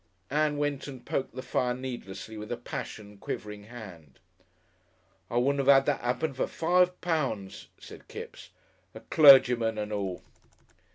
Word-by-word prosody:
Ann 150 Hz, 0 st, +1 dB
went 145 Hz, -1 st, -2 dB
and 130 Hz, -3 st, -9 dB
poked 130 Hz, -3 st, -3 dB
the 130 Hz, -, -5 dB
fire 125 Hz, -1 st, 0 dB
needlessly 115 Hz, -5 st, -7 dB
with 105 Hz, 0 st, -8 dB
a 120 Hz, -, -2 dB
passion 105 Hz, -3 st, -7 dB
quivering 105 Hz, 0 st, -6 dB
hand. 95 Hz, -, -12 dB, 1.1 s
"I 120 Hz, -, -2 dB
wouldn't 140 Hz, +3 st, +2 dB
'ave 135 Hz, +1 st, +6 dB
'ad 135 Hz, 0 st, +5 dB
that 145 Hz, -, 0 dB
'appen 125 Hz, +5 st, -1 dB
for 130 Hz, -, -1 dB
five 180 Hz, +2 st, +2 dB
pounds," 135 Hz, -, -2 dB
said -, -, -13 dB
Kipps. -, -, -9 dB, 0.5 s
"A -, -, -9 dB
clergyman 125 Hz, -6 st, +6 dB
and 105 Hz, 0 st, -3 dB
all!" 95 Hz, -3 st, -3 dB
125 Hz, 150 wpm, -28 LUFS, 105-140 Hz, 1.1 s, ave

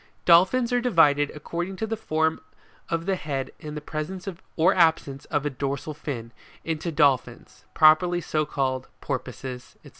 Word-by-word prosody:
Dolphins 195 Hz, +9 st, +5 dB
are 245 Hz, -, +2 dB
divided, 150 Hz, -, +3 dB
according 175 Hz, +5 st, -4 dB
to 220 Hz, -, -3 dB
the 225 Hz, +1 st, -2 dB
form 160 Hz, -6 st, 0 dB, 0.5 s
of 165 Hz, 0 st, -1 dB
the 195 Hz, 0 st, +1 dB
head 140 Hz, -6 st, -4 dB
and 150 Hz, 0 st, -7 dB
the -, -, -5 dB
presence 160 Hz, +6 st, -5 dB, 0.3 s
or 165 Hz, +2 st, +4 dB
absence 160 Hz, -5 st, +2 dB
of 145 Hz, -1 st, -2 dB
a 145 Hz, -, 0 dB
dorsal 140 Hz, +3 st, -3 dB
fin, 120 Hz, -6 st, -6 dB, 0.3 s
into 165 Hz, +1 st, -3 dB
Dolphins 145 Hz, -5 st, 0 dB
properly 155 Hz, +3 st, +5 dB
so 155 Hz, -2 st, -1 dB
called, 130 Hz, -3 st, -2 dB
Porpoises, 130 Hz, -1 st, -6 dB
&c. -, -, -13 dB
155 Hz, 155 wpm, -25 LUFS, 140-175 Hz, 0.5 s, Dolphins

